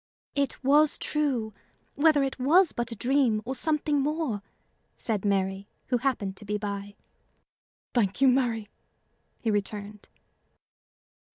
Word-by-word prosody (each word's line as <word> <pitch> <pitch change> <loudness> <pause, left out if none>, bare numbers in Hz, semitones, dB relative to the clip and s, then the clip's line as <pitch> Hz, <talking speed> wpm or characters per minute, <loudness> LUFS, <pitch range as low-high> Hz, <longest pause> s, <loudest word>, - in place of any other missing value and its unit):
"It 280 -1 -2
was 295 +3 +4
true, 260 -8 -1 0.4
whether 295 -1 +4
it 270 0 -3
was 325 +7 +5
but 240 0 -3
a - - -4
dream 250 -2 +2
or 260 - -2
something 300 0 +1
more," 295 -7 -1 0.5
said 215 -4 -2
Mary, 195 -1 0 0.2
who 250 -2 +2
happened 230 -7 -1
to - - -7
be 210 +1 -1
by. 205 -1 -5 1.0
"Thank 205 -4 +1
you, 270 - +5
Mary," 240 -4 +2 0.8
he 225 - +1
returned. 205 0 -4
240 Hz, 125 wpm, -27 LUFS, 205-280 Hz, 1.0 s, was